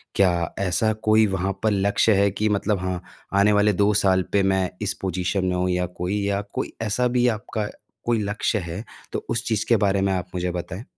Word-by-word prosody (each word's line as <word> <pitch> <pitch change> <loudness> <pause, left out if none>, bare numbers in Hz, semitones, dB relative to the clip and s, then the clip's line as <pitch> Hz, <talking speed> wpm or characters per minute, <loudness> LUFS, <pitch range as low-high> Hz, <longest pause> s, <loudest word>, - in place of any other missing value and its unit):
क्या 90 -4 +2
ऐसा 100 +3 +1 0.2
कोई 110 0 +6
वहाँ 95 0 -1
पर 110 - +3
लक्ष्य 100 +2 +3
है 100 - +4
कि 105 +2 0
मतलब 105 0 0
हाँ, 90 -1 -3 0.3
आने 100 +1 +4
वाले 105 0 +4
2 100 +2 +3
साल 95 -2 +3
पे 100 -1 +4
मैं 95 -1 +1
इस 105 - 0
पोजीशन 95 +1 -1
में 90 0 0
हूँ 90 0 0
या 90 0 +1
कोई 90 +3 -3
या 100 0 0
कोई - - -3
ऐसा 115 +3 +1
भी 125 0 +4
आपका 110 -2 -4 0.4
कोई 115 -1 +2
लक्ष्य 105 +1 -1
है 85 +5 -5 0.3
तो - - -4
उस 115 - -1
चीज 110 -1 +1
के 120 - +6
बारे 100 -2 +2
में 95 0 +1
आप 90 -2 -2
मुझे 90 0 -1
बताएँ। 90 +3 -5
100 Hz, 215 wpm, -23 LUFS, 90-105 Hz, 0.4 s, कोई